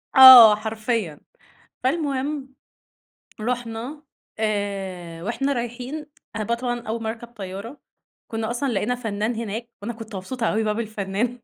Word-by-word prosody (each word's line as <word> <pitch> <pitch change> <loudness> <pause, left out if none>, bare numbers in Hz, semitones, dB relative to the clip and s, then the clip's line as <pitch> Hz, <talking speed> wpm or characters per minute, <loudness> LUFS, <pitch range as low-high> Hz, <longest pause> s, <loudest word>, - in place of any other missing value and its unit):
آه 255 -5 +12
حرفيًا. 215 - -3 0.7
فالمهم 280 -1 -1 0.9
رُحنا 245 +5 -4 0.4
آآ 195 -5 -3
وإحنا 270 +6 -1
رايحين، 250 +5 -5 0.3
أنا 215 - -1
بقى 235 +3 0
طبعًا 240 0 -2
أول 225 +1 -3
مرّة 220 - -1
أركب 235 +1 -10
طيارة، 210 +3 -8 0.5
كُنّا 225 -1 -3
أصلًا 245 0 -1
لقينا 215 +5 0
فنّان 220 -1 -2
هناك 230 +1 -4
وأنا 235 +3 -4
كنت 220 -2 -9
مبسوطة 225 +5 -4
أوي 220 +1 +1
بقى 215 -1 0
بالفنّان 220 +2 -2
225 Hz, 130 wpm, -23 LUFS, 210-245 Hz, 0.9 s, آه